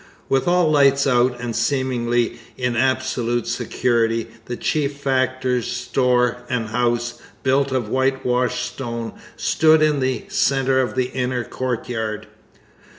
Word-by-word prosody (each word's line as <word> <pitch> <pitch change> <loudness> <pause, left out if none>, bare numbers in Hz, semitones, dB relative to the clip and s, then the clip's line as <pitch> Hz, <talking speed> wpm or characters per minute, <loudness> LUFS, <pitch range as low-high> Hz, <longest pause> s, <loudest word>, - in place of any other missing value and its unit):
With 135 +3 +1
all 175 -3 +3
lights 140 -1 +4
out 125 -1 +2
and 120 -2 -4
seemingly 120 -1 0 0.2
in 125 -1 -1
absolute 125 -1 0
security, 115 -1 0 0.2
the 120 - -4
chief 145 -2 -1
factor's 130 -2 0
store 125 -1 +1
and 115 -3 -1
house, 120 0 -1 0.2
built 135 +1 +2
of 130 -4 -1
whitewashed 125 -1 0
stone, 115 -3 -5 0.2
stood 155 -1 +4
in 150 -2 +2
the 130 -3 -1
centre 135 -1 +2
of 130 - -2
the 130 -1 0
inner 125 -1 -1
courtyard. 110 -4 -3
125 Hz, 125 wpm, -21 LUFS, 120-135 Hz, 0.2 s, lights